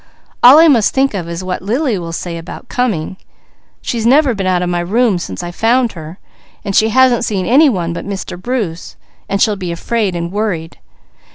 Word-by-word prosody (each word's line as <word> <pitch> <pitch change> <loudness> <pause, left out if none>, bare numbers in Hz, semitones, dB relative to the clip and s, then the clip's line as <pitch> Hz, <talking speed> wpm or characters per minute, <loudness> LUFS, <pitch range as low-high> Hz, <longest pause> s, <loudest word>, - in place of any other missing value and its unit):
All 255 +4 +9
I 330 +1 +7
must 240 -8 +3
think 270 -1 +2
of 175 -4 -4
is 170 +2 -5
what 185 0 -4
Lily 230 - -1
will 170 -1 -6
say 170 0 -5
about 175 +8 -10
coming. 195 -8 -2 0.7
She's 230 -2 -2
never 265 +2 +4
been 195 -3 -3
out 180 -1 +1
of 175 - -2
my 175 0 -1
room 205 +2 +1
since 95 - -6
I 175 - -5
found 235 +5 +1
her, 160 +1 -10 0.5
and 195 -2 -2
she 220 - +4
hasn't 255 0 +3
seen 190 -4 -2
any 285 +5 +5
one 175 -7 -2
but - - -6
Mr. 195 -3 -5
Bruce, 205 -8 -4 0.3
so 200 - 0
she'll 210 +1 +2
be 185 -3 -5
afraid, 205 +2 -2
and 170 0 -4
worried. 190 -6 -3
200 Hz, 200 wpm, -15 LUFS, 175-240 Hz, 0.7 s, All